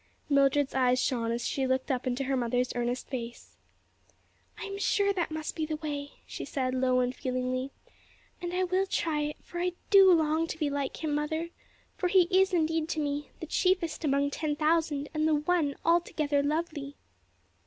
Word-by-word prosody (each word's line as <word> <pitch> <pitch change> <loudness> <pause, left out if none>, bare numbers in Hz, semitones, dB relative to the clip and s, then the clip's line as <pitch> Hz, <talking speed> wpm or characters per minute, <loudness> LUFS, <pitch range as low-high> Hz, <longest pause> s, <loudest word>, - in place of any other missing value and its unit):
Mildred's 280 0 +3
eyes 255 -1 +3
shone 235 -3 0
as 235 0 -2
she 270 -1 -1
looked 260 +2 0
up 255 0 -2
into 255 +2 -1
her 270 0 0
mother's 245 0 0
earnest 245 +1 -2
face. 240 -3 -7 1.0
"I - - -7
am 395 0 -6
sure 400 0 +2
that 355 -3 -1
must 315 -1 -4
be 320 - -2
the 310 0 -2
way," 290 -2 -5
she - - -7
said, 255 -3 -2
low 255 -1 +2
and 250 0 0
feelingly, 255 +1 -2 0.7
"and 350 -1 -3
I 365 +1 0
will 370 +2 +1
try 315 -5 0
it; 295 0 -2
for 345 - -7
I 360 0 0 0.2
do 390 -2 +8
long 320 -1 +2
to 325 - -5
be 300 -3 -1
like 280 +2 -3
Him, 305 -2 0
mother; 315 +3 -1 0.5
for 365 - 0
He 370 0 +5
is 380 +1 +4
indeed 325 -2 +1
to 320 - -1
me, 290 0 -2
'the - - -3
chiefest 345 -1 0
among 280 -1 +1
ten 300 0 -2
thousand 305 -2 +1
and 310 0 +1
the 315 - +3
one 300 -1 +1
altogether 310 -4 +2
lovely!'" 295 -1 -2
300 Hz, 185 wpm, -29 LUFS, 265-330 Hz, 1.0 s, do